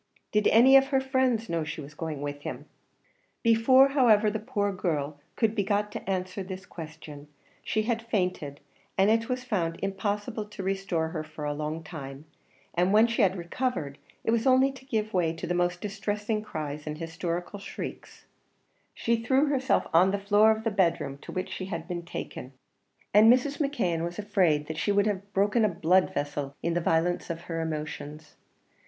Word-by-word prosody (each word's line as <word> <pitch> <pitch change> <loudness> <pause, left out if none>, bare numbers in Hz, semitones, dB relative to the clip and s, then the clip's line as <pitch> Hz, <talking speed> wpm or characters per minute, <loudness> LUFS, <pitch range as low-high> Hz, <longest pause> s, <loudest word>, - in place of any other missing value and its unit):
"Did 210 -1 +3
any 255 +5 +7
of 270 0 +4
her 270 -1 +2
friends 260 -4 +1
know 165 -1 -1
she 155 +1 -5
was 145 0 -9
going 150 -2 -5
with 145 0 -5
him?" - - -6 0.8
Before, 255 +4 +6
however, 225 -6 +4
the 220 - -2
poor 210 -3 -1
girl 150 -5 -2 0.2
could 225 -2 +1
be 215 - +1
got 210 +1 0
to - - -6
answer 185 0 -2
this 185 0 -7
question, 155 -3 -10 0.3
she 215 +1 -1
had 230 0 -1
fainted, 180 -10 -2 0.4
and 195 +2 +5
it 230 +2 +1
was 250 0 -2
found 175 -9 -1
impossible 205 +3 -2
to 210 -2 -8
restore 190 -4 -1
her 155 -1 -4
for 155 -1 -8
a 145 - -1
long 155 +2 -4
time; 140 -3 -8 0.5
and 180 +2 +2
when 215 +2 +6
she 235 +1 0
had 190 -2 +3
recovered, 170 - -3 0.2
it - - +1
was 230 +3 +1
only 260 +1 +5
to 265 -1 -14
give 220 -5 -2
way 170 -3 +1
to 165 - -6
the 175 - -1
most 175 0 0
distressing 210 +1 -2
cries 150 -6 -6
and 150 0 -4
hysterical 170 +4 -4
shrieks; 195 - -8 0.7
she 230 0 0
threw 270 +5 +3
herself 265 -2 +1
on 180 +3 +6
the 200 - 0
floor 205 +2 +4
of 220 0 +1
the 225 - 0
bedroom 165 -8 0
to - - -10
which 185 +1 -3
she 185 - -4
had 170 -3 -5
been 175 -2 -3
taken, 140 -5 -7 0.6
and 215 +3 +8
Mrs. 275 +3 +2
McKeon 230 - 0
was 175 +1 -4
afraid 185 -8 +2
that 160 +1 -5
she 205 - +1
would 200 0 +3
have 200 -1 -2
broken 205 +4 +2
a 215 - +4
blood 180 +1 +2
vessel 145 -1 -3
in 170 - 0
the 175 - 0
violence 165 +2 +1
of 170 0 -4
her 165 -1 -4
emotions. 155 -1 -6
190 Hz, 190 wpm, -28 LUFS, 165-220 Hz, 0.8 s, and